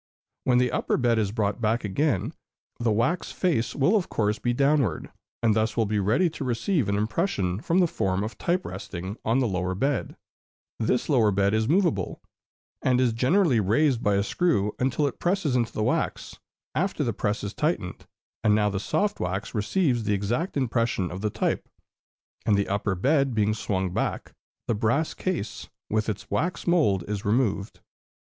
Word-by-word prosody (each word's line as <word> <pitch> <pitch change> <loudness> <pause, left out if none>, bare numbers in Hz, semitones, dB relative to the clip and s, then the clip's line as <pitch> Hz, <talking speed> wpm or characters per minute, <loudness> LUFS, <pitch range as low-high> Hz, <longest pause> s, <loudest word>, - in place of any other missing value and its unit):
When 125 -1 +4
the 125 0 +2
upper - - 0
bed 120 -3 +2
is 100 -3 0
brought 105 0 -1
back 115 +2 +1
again, 115 - 0 0.5
the 120 -2 +1
wax 120 +12 0
face 120 - 0
will 165 +10 +3
of 195 -5 0
course 105 -1 0
be 120 - 0
downward, 135 - +1 0.3
and 110 -2 +4
thus 110 0 0
will 115 - +3
be 105 0 0
ready 110 - +3
to 150 - -6
receive 125 - 0
an 100 - +1
impression 105 - -1
from 165 +9 0
the 185 - +5
form 95 - -1
of 110 - -5
type 180 +2 0
resting 95 +1 -6
on 115 +3 +2
the 130 -2 +2
lower 90 -2 -1
bed; 135 +8 -1 0.6
this 115 +2 0
lower 120 -8 +4
bed 100 0 +2
is 110 +2 +1
movable, 175 0 +1 0.6
and 125 -1 +2
is 125 -3 +2
gently 130 - +3
raised 120 +5 +2
by 105 -1 +2
a 100 - +2
screw 105 - +1
until 130 +3 +1
it 140 - -3
presses 175 -7 0
into 120 -2 +1
the 110 - -2
wax, - - -2 0.3
after 175 -2 0
the 120 -4 -1
press 105 +1 -2
is 100 0 -4
tightened, 150 - -2 0.4
and 105 -1 +4
now 105 -1 +2
the 95 - -2
soft 205 - 0
wax 95 +2 -3
receives 120 - +1
the 105 -1 +2
exact 120 - -2
impression 115 -7 0
of 95 +2 -6
the 105 - 0
type; - - -2 0.7
and 105 - +3
the 100 - 0
upper 100 0 -1
bed 135 - +2
being 105 0 +2
swung 95 -3 -2
back, - - -2 0.3
the - - +2
brass 120 +9 0
case, 180 - -4 0.2
with 110 0 +1
its 105 -1 -5
wax 180 +3 -1
mould, 150 - +3
is 105 -1 -3
removed. 105 -2 0
115 Hz, 180 wpm, -26 LUFS, 100-140 Hz, 0.7 s, the